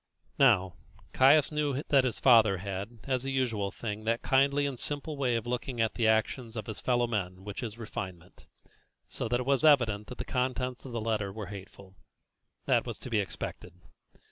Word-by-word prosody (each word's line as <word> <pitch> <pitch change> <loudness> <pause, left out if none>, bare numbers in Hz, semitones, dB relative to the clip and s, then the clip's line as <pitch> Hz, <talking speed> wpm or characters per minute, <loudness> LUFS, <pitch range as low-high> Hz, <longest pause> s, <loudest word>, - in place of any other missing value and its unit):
Now, 95 -10 +4 0.4
Caius 140 +3 +5
knew 145 -2 -1
that 135 -2 +5
his 125 - -2
father 110 -6 +6
had, 100 +4 -6
as 130 -2 -1
a 135 - -3
usual 120 -7 0
thing, 105 0 -5
that 115 +1 0
kindly 140 +2 +3
and 135 -4 -3
simple 145 +1 -4
way 130 -4 0
of 115 -1 -2
looking 125 0 -3
at 110 -1 +1
the 115 -2 +1
actions 110 +2 0
of 110 - -4
his 110 - -6
fellow 120 -1 +1
men 95 -5 -3
which 100 0 -6
is 115 -3 -6
refinement, 95 -6 -8 0.6
so - - -4
that 120 +2 0
it - - -5
was 140 +1 +2
evident 115 -9 +4
that 125 - -8
the - - -4
contents 125 0 -2
of 130 - -7
the 115 - -3
letter 110 -3 -1
were 105 +1 -6
hateful. 95 -1 -11 0.7
That - - +2
was - - -5
to 125 - -9
be 110 - +2
expected. 95 -4 -5
115 Hz, 195 wpm, -30 LUFS, 105-130 Hz, 0.7 s, father